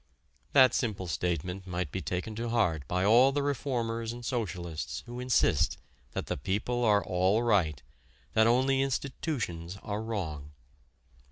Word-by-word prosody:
That 130 -2 +7
simple 105 -6 -1
statement 90 +3 -2
might 90 -3 -3
be - - -3
taken 90 +5 -3
to 115 +1 -2
heart 85 -11 +1
by 90 +1 0
all 120 +6 +6
the 145 +1 0
reformers 120 -5 -1
and 120 0 -8
socialists 90 - -3
who 120 +1 -7
insist 125 - +2 0.4
that - - -3
the - - -3
people 105 - -1
are 105 -3 +4
all 95 +5 +2
right, 85 - +2 0.5
that 110 0 +5
only 130 +3 +3
institutions 125 - -3
are 105 +1 -3
wrong. 80 -10 -4
110 Hz, 145 wpm, -30 LUFS, 90-120 Hz, 0.5 s, That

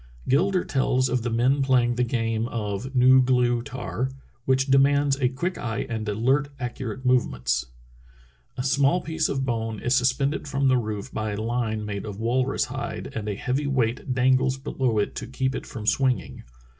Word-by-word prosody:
Gilder 180 +7 +2
tells 130 -1 +1
of 125 -1 0
the 120 - -2
men 125 +5 +2
playing 125 -3 +3
the 125 +1 0
game 115 -2 -1
of 110 +3 -4
nu 130 +1 +6
glew'tary 125 0 0 0.3
which 130 0 +2
demands 140 +1 +4
a 130 -3 +2
quick 175 +8 -3
eye 110 -3 -3
and 110 -2 -3
alert, 130 +7 +1
accurate 125 0 -5
movements: 65 - +1 0.9
"A 125 - -2
small 140 +6 +2
piece 160 0 -1
of 135 -1 -1
bone 115 -3 -2
is 120 - 0
sus 125 0 +4
pended 140 +3 -2
from 140 -1 +1
the 130 - +4
roof 110 +1 -5
by 110 -1 -2
a - - -4
line 110 -1 -2
made 100 0 -4
of 100 -2 -6
walrus 125 +4 +1
hide, - - -5
and 105 -1 -4
a 100 - -2
heavy 130 +7 -1
weight 125 -2 0
dangles 130 +1 +2
below 130 -4 -1
it 105 - 0
to - - -5
keep 130 +2 -1
it - - -5
from 110 -5 -7
swinging. 130 +2 0
125 Hz, 180 wpm, -25 LUFS, 115-135 Hz, 0.9 s, nu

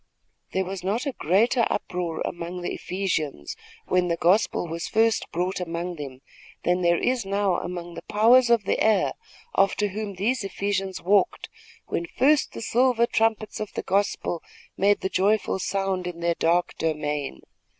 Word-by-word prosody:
There 190 0 +1
was 190 -1 -6
not 215 +8 -1
a 280 - 0
greater 230 - +2
uproar 175 -4 -3
among 175 +1 -5
the - - -2
Ephesians, 160 - -3 0.3
when 180 -1 +2
the 170 -1 0
gospel 180 +1 +2
was 165 +1 -4
first 225 0 +1
brought 180 +3 -1
among 175 0 -4
them, 135 -3 -8 0.4
than 180 +1 +2
there 170 -1 +3
is 250 +3 0
now 195 -2 +1
among 175 -1 -6
the 170 - -7
powers 235 +6 +4
of 235 -3 +4
the - - 0
air 215 -3 +3 0.4
after 195 +1 +2
whom 205 0 -5
those 225 +5 0
Ephesians 195 -1 -2
walked, 195 +1 +2 0.4
when 170 - -3
first 285 +3 +3
the - - -6
silver 240 0 +3
trumpets 220 -2 0
of 215 - -4
the - - -3
gospel 195 -3 0 0.3
made 200 +1 +3
the - - 0
joyful 195 +1 +1
sound 190 -1 -1
in 175 -1 -6
their 170 0 +1
dark 170 +2 +1
domain. 150 - -2
190 Hz, 160 wpm, -25 LUFS, 175-215 Hz, 0.4 s, powers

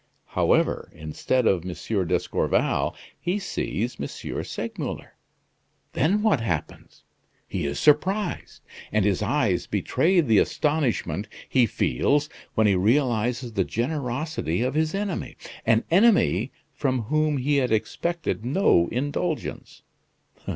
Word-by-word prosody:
However, - - +1
instead 80 +11 -1
of 90 -6 +2
M. 95 +1 -2
d'Escorval, - - 0 0.2
he 180 +4 -1
sees 125 - -3
M. - - -2 0.4
Segmuller. - - -5 0.8
Then 205 +6 +2
what 205 - +3
happens? 85 -9 -4 0.4
He 85 -6 -2
is 70 - -3
surprised, 180 +6 +1 0.3
and 105 -2 +2
his 100 -3 +1
eyes - - +1
betray 180 +2 +2
the 115 -10 +4
astonishment 145 -8 0 0.2
he 125 -3 +3
feels 145 - +1 0.3
when 110 - +3
he 100 - +4
realizes 120 +3 +1
the 100 -2 +2
generosity 125 - -2
of 130 +1 -1
his 155 +3 0
enemy 200 -2 -3 0.3
an 115 0 +4
enemy 200 - +4 0.2
from 130 -4 -1
whom 155 +4 +1
he 140 +3 +1
had 125 -4 +1
expected 165 +5 -1
no 125 - +3
indulgence. 145 +6 -3
130 Hz, 115 wpm, -25 LUFS, 110-155 Hz, 0.8 s, the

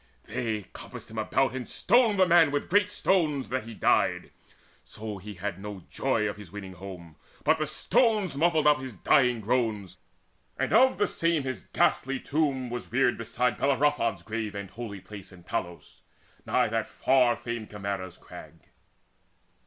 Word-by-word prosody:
They 110 -3 -3
compassed - - -10
him 110 - -4
about, 130 +5 +1
And 130 -2 -5
stoned 225 0 +3
the 190 - +6
man 170 -3 +6
with 145 +2 -3
great 205 +1 +4
stones, 155 -10 +1
that 130 -2 -2
he 115 -1 -9
died. - - +1 0.5
So 105 -2 -7
had 100 -1 -5
he 95 - -14
no 100 -3 -7
joy 115 -5 0
of 100 - -4
his 100 -5 -12
winning 95 -2 -8
home, 90 -4 -10 0.3
But 160 - +3
the 155 - 0
stones 215 - +1
muffled 160 0 +2
up 150 -1 +5
his 130 -4 -7
dying 125 +3 +3
groans, 110 -4 -1 0.6
And - - -1
of 260 +4 +5
the 205 - +3
same 165 -5 0
his 130 -6 -5
ghastly 135 0 +1
tomb 135 -5 -1
was 120 0 -6
reared 125 0 +3
Beside 115 0 0
Bellerophon's 135 -8 +1
grave 110 0 -4
and 100 -1 -6
holy 105 -3 -7
place 100 0 -11
In 90 -2 -15
Tlos, 85 0 -5 0.5
nigh - - +3
that - - -1
far 125 -3 +3
famed 120 -2 -5
Chimaera's 100 -3 -5
Crag. 85 -2 -13
120 Hz, 165 wpm, -28 LUFS, 100-145 Hz, 0.6 s, the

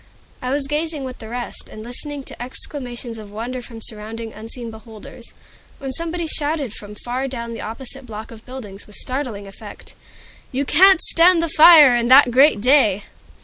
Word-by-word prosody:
I 250 - -3
was 280 +1 0
gazing 300 0 -2
with 255 -1 -7
the 220 - -9
rest, 245 +1 -6
and 215 - -9
listening 275 +4 -5
to - - -5
exclamations 245 -2 -6
of 210 -1 -10
wonder 235 +5 -5
from 230 -2 -9
surrounding 220 +1 -5
unseen 225 +2 -7
beholders, 220 -1 -12 0.5
when 270 -1 -6
somebody 335 +4 -2
shouted 295 -6 -1
from 205 0 -9
far 250 +5 -4
down 235 -3 -6
the - - -7
opposite 255 +3 -6
block 220 0 -8
of 225 -1 -12
buildings, 220 -7 -10
with 210 - -12
startling 255 -6 -4
effect, 205 +1 -12 0.6
"You 270 +2 -1
can't 375 +5 +5
stand 335 0 +4
the 335 - -1
fire 305 -5 +8
In 235 0 +1
that 260 0 +7
great 265 -3 +5
day!" 220 -6 +3
250 Hz, 175 wpm, -20 LUFS, 225-285 Hz, 0.6 s, fire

